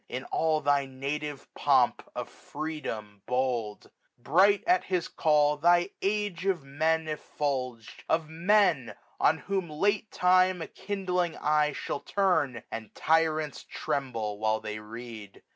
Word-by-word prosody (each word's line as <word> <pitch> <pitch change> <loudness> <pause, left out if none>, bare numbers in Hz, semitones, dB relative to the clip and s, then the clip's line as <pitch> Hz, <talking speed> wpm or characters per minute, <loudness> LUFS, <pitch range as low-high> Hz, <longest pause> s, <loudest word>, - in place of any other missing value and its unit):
In 125 +2 -4
all 160 -1 +1
thy 140 -1 +2
native 140 +2 -4
pomp - - +2
of - - -4
freedom 115 -10 -6
bold. 125 -5 -1 0.3
Bright, 190 +11 +4
at 360 +1 +3
his 180 -3 -1
call, 150 -1 +2
thy 175 +4 +3
Age 200 -3 -1
of 180 -7 +1
Men 160 +4 0
effulg'd. 130 -6 -4
Of 160 -1 +1
Men 170 - +2 0.2
on - - +4
whom 190 -3 -3
late 200 +7 0
time 185 0 +3
a 165 - -5
kindling 180 -4 -2
eye 150 0 +2
Shall 140 - -4
turn, 160 - 0
and 115 -2 -7
tyrants 155 -2 +1
tremble 115 -7 -3
while 110 0 +1
they 105 0 -5
read. 110 -2 -10
150 Hz, 130 wpm, -28 LUFS, 125-180 Hz, 0.3 s, Bright